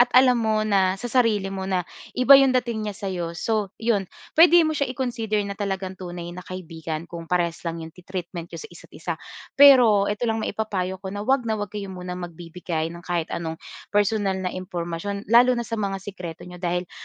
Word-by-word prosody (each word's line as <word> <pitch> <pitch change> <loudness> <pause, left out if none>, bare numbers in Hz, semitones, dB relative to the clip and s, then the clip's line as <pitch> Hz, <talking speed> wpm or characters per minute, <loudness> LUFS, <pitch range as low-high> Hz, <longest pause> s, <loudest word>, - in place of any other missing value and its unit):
at 245 - +6
alam 255 -2 +6
mo 215 -1 +1
na 195 -3 +2
sa 245 - -5
sarili 215 -6 +2
mo 190 0 -4
na 180 -2 0 0.3
iba 260 +2 +8
‘yong 270 -2 +6
dating 220 -3 -3
niya 205 - -5
sa’yo, 175 -4 -4
so 215 +2 0
‘yon. 215 -5 0 0.3
Puwede 345 +2 +8
mo 315 - +1
siya 280 -3 -1
i-consider 235 -4 -2
na 200 - -4
talagang 195 -2 -3
tunay 175 -2 -7
na 180 - -8
kaibigan 165 -3 -6
kung 165 -1 -8
parehas 170 -2 0
lang 165 -1 -3
‘yong 160 - -10
treatment 175 -2 -6
n'yo - - -7
sa - - -7
isa’t-isa. - - -7 0.4
Pero 245 -8 +7
ito 210 +4 -2
lang 225 -1 0
maipapayo 190 -4 -2
ko, 190 0 -7
na 205 - -3
‘wag 260 0 +1
na 220 - +1
‘wag 205 -2 -4
kayo 205 -2 -5
muna 180 0 -6
magbibigay 170 -1 -4
ng 170 +1 -10
kahit 175 -2 -1
anong 160 -1 -3 0.4
personal 205 -2 +2
na 185 -1 -2
impormasyon, 185 +2 -5
lalo 245 +2 +6
na 235 - -1
sa 230 0 -4
mga 195 -2 -2
sikreto 180 -4 -7
n’yo. 180 0 -10
Dahil, 175 0 -2
195 Hz, 200 wpm, -24 LUFS, 175-220 Hz, 0.4 s, iba